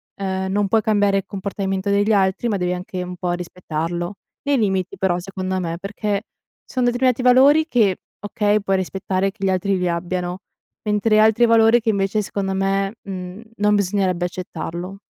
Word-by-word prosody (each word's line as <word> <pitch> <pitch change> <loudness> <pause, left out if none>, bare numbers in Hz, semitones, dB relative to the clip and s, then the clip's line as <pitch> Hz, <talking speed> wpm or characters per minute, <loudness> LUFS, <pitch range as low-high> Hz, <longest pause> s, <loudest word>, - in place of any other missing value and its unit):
ehm, 190 -1 -2
non 205 +1 +1
puoi 220 +3 +3
cambiare 205 -2 +2
il 195 - -1
comportamento 195 0 -3
degli 205 +2 +2
altri, 195 +3 +2
ma 210 -3 0
devi 180 -1 -1
anche 180 0 -5
un 180 0 -5
po' 180 0 -2
rispettarlo, 175 0 -4 0.3
nei 285 -1 +2
limiti 190 -4 0
però 185 -2 +1
secondo 185 0 -3
me, 170 -2 -3
perché 205 +1 -2 0.4
ci - - -16
son 255 - +2
determinati 245 0 +2
valori 270 +5 +6
che, 215 - +2 0.2
okay, 205 +1 +1
puoi 195 -1 0
rispettare 190 +1 -1
che 200 0 -11
gli 195 - +2
altri 190 +1 +1
li 180 -1 0
abbiano, 175 +1 -3 0.4
mentre 215 +1 +2
altri 220 +2 +5
valori 225 +1 +5
che 225 - 0
invece 200 0 +1
secondo 195 -1 -3
me, 195 +1 0
mhmm, 185 0 -7
non 210 0 +2
bisognerebbe 190 -3 0
accettarlo. 180 +1 -6
195 Hz, 175 wpm, -21 LUFS, 185-210 Hz, 0.4 s, valori